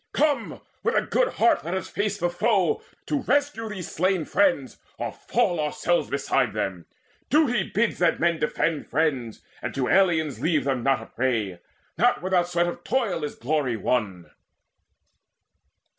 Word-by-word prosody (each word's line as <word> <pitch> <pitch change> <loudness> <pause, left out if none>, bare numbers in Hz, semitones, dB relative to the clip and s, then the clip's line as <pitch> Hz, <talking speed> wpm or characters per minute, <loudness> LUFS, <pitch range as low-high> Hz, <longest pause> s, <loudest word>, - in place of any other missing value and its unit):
Come, 290 -6 0 0.2
with - - 0
a - - +3
good - - +1
heart 345 -3 +3
let 170 +3 -3
us 190 - -3
face 205 0 -2
the 175 -3 0
foe 190 -2 +1 0.2
To 290 -2 -1
rescue 285 -5 0
these 190 -5 -6
slain 185 -1 +1
friends, 175 -10 +1 0.2
or - - -3
fall 175 -2 0
ourselves 155 - 0
Beside - - 0
them. - - -3 0.4
Duty 280 -8 +3
bids 215 +2 0
that 170 -2 +2
men 170 -1 +2
defend 150 0 -1
Friends, 135 -7 -1 0.2
and - - -4
to 130 -2 0
aliens 165 -7 +2
leave 160 -4 +2
them 135 -3 0
not 135 -2 +1
a - - -10
prey, 110 -9 -1 0.4
Not 240 -3 +3
without 180 -2 +2
sweat 175 0 +1
of 175 - -5
toil 215 -11 0
is 150 - -4
glory 135 -2 -1
won!" 100 -6 -2
175 Hz, 160 wpm, -25 LUFS, 140-210 Hz, 0.4 s, a